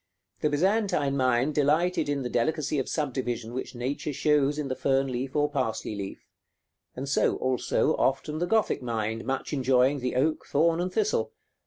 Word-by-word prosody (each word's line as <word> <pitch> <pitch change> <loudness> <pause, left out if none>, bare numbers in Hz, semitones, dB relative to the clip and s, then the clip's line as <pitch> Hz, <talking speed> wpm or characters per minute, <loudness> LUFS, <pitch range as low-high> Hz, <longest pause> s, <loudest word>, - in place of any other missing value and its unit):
The 150 - +1
Byzantine 170 -3 +1
mind 130 +2 +2
delighted 155 +2 +2
in 140 -2 -1
the - - -2
delicacy 150 +4 0
of 130 - -3
subdivision 125 -6 -2
which 130 0 -5
nature 135 +4 -3
shows 145 0 +2
in 150 -2 -2
the 130 - -2
fern 135 0 +1
leaf 130 +2 -4
or 145 0 +3
parsley 135 -7 -2
leaf; 100 -1 -7 0.7
and 135 +2 -5
so, 140 - +2
also, 130 -1 +1
often 150 +3 0
the 175 - 0
Gothic 220 -4 +1
mind, 115 -2 -3
much 135 +2 -3
enjoying 130 0 +3
the 125 0 -2
oak, 155 +5 0
thorn, 165 +3 +2
and 180 +1 -2
thistle. 190 - 0
140 Hz, 170 wpm, -27 LUFS, 125-150 Hz, 0.7 s, or